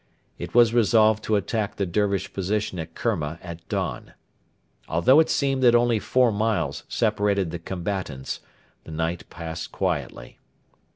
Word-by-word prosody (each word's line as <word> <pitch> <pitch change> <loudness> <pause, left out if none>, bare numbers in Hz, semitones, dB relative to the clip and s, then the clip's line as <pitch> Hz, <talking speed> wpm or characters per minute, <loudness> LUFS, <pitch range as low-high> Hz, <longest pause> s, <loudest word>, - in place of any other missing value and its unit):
It - - -7
was 120 -1 +6
resolved 110 -2 +4
to 110 - +2
attack 105 +1 -1
the 100 - -1
Dervish 100 +1 -1
position 100 -1 -2
at 80 0 -7
Kerma 85 -9 -2
at 85 -1 -9
dawn. - - -3 0.7
Although 85 - +5
it 160 - +3
seemed 135 -2 +1
that 120 -2 +6
only 120 -2 +3
four 125 +2 +2
miles 100 -9 -1
separated 100 -4 +1
the 85 - -5
combatants, 90 -6 -4 0.4
the - - -13
night 80 +2 -3
passed 80 -1 -6
quietly. 70 -10 -3
100 Hz, 140 wpm, -24 LUFS, 85-110 Hz, 0.7 s, was